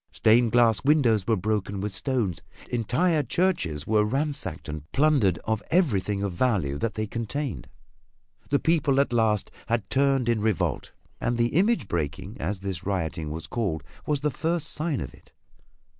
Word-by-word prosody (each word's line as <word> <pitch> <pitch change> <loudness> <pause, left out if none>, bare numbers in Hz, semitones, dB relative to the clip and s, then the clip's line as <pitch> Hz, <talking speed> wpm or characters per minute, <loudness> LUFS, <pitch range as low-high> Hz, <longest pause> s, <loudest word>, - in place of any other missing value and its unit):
Stained 115 +1 +3
glass 115 -3 +4
windows 125 -9 +3
were 115 - +3
broken 100 0 -1
with 100 0 -3
stones; 105 - -1 0.3
entire 140 - +1
churches 125 - 0
were 105 -1 +3
ransacked 140 +7 -2
and 75 0 -7
plundered 135 - +3
of 110 -1 0
everything 105 - +1
of 100 -3 -2
value 90 - +1
that 115 - -2
they 110 - -1
contained. 120 +6 -4 0.8
The 140 - +3
people 155 -3 +2
at 140 -3 +1
last 110 -3 +1 0.2
had 115 -3 0
turned 135 -2 +2
in 115 -3 +2
revolt, 110 -5 -1 0.3
and 120 - -1
"the 120 0 +2
image 195 - +2
breaking" 80 -6 -3
as 95 +5 -3
this 95 -3 -4
rioting 85 -5 -2
was 80 +2 -5
called, 95 - -2 0.2
was 145 -2 +1
the 150 0 +1
first 165 +4 -1
sign 155 -2 -1
of - - -6
it. - - -20
115 Hz, 160 wpm, -26 LUFS, 100-140 Hz, 0.8 s, glass